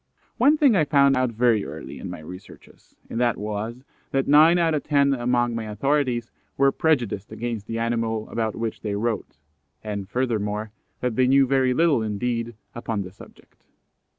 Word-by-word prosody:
One 280 +5 +5
thing 280 -7 +4
I 165 - +4
found 140 -2 +4
out 130 -1 +1
very 115 -2 +2
early - - -8
in - - -6
my - - -7
researches, 90 +5 -13
and 115 - -4
that 120 -2 +2
was, 110 +4 -5 0.3
that 135 -1 0
nine 155 +4 +6
out 165 -2 +2
of 150 - 0
ten 140 -2 +2
among 120 -1 +1
my 115 -1 -3
authorities 125 +1 0 0.3
were 140 0 +4
prejudiced 125 -12 0
against 115 -3 -4
the 115 - -3
animal 115 -1 -1
about 110 -2 -2
which 115 -1 -4
they 105 -2 -3
wrote, 110 -5 -3 0.5
and 100 -3 -5
furthermore, 110 -4 -2 0.3
that 125 -3 -1
they 130 -1 +4
knew 135 +1 +5
very 130 -1 +2
little 160 -6 +3
indeed 115 +2 -2 0.2
upon 115 -3 -3
the 90 - -9
subject. 100 - -18
120 Hz, 175 wpm, -24 LUFS, 110-135 Hz, 0.5 s, nine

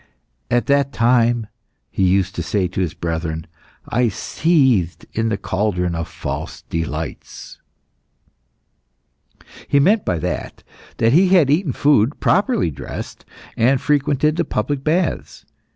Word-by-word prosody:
"At 120 -2 +1
that 140 +1 +2
time," 120 -1 +2 0.5
he - - -3
used 95 0 +2
to - - -4
say 100 -3 0
to 90 +1 -1
the 75 - -11
brethren, 80 -1 -3 0.4
"I 120 0 +1
seethed 130 - +1
in 115 0 0
the 105 - -1
cauldron 90 -4 -1
of 85 0 -3
false - - -6
delights." 80 0 -6 2.1
He 140 - +3
meant 200 +9 +3
by 90 - -1
that 80 - -5 0.3
that 115 +2 +3
he 185 +5 +5
had 175 -7 +4
eaten 155 0 +1
food 140 -3 +2
properly 205 - +2
dressed, - - -8 0.3
and 130 +4 +3
frequented 150 +2 +1
the 170 - +2
public 135 +1 -2
baths. 165 +3 -1
120 Hz, 130 wpm, -20 LUFS, 95-145 Hz, 2.1 s, he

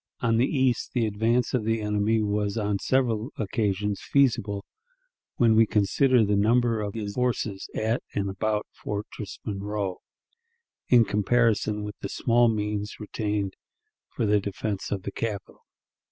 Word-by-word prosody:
On 115 -2 +2
the 125 +3 +3
east, 130 -4 0
the 120 -3 +2
advance 110 +3 +1
of 125 -4 +1
the 115 +1 0
enemy 105 +1 +1
was 105 +1 -1
on 105 -2 0
several 120 -2 +1
occasions 105 -1 -1
feasible, 115 -7 +1 0.7
when 115 -2 +4
we 110 0 +5
consider 115 +4 +3
the 100 0 +1
number 115 +2 +2
of 105 0 -4
his 105 -2 -4
forces 115 -5 -1
at 110 +2 0
and 100 -1 0
about 105 +2 -1
Fortress 105 0 -6
Monroe, 100 -2 -3 0.9
in 120 -2 +6
comparison 105 0 +1
with 105 0 -7
the 100 - -5
small 120 +3 +3
means 105 -1 -2
retained 105 -2 -2 0.6
for - - 0
the 105 0 +3
defense 100 0 -4
of 95 -2 -3
the 100 - -4
capital. 105 -2 -5
105 Hz, 145 wpm, -26 LUFS, 100-115 Hz, 0.9 s, in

